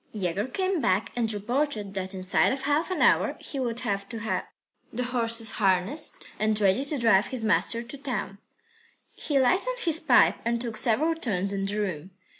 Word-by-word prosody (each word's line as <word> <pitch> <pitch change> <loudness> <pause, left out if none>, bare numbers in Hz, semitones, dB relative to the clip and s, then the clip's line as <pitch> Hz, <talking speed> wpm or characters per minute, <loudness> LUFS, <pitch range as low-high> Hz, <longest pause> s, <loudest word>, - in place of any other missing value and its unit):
III - - -4
Yegor 190 +5 -1
came 370 +4 -1
back 190 0 +1
and 230 -2 0
reported 215 -1 -2
that 190 -1 -4
inside 185 0 +2
of 270 0 -3
half 295 +5 +1
an 370 - 0
hour - - +3
he 275 - -6
would 240 -2 -2
have 200 -4 -3
to 230 - -6
have 220 0 -2 0.4
the 250 +2 -3
horses 230 -2 -1
harnessed, 195 - +1
ready 215 +2 +2
to 285 +1 -1
drive 225 -4 +3
his 255 -4 -4
master 230 +2 +1
to 250 +4 -9
town. 240 -7 -4 0.7
He 290 - -1
lighted 375 - +2
his 325 -5 +2
pipe 285 -7 +4
and 235 0 0
took 230 -2 -3
several 255 +8 +3
turns 200 - -2
in 195 0 -2
the 205 +2 -2
room. 185 -3 -4
230 Hz, 185 wpm, -26 LUFS, 200-270 Hz, 0.7 s, pipe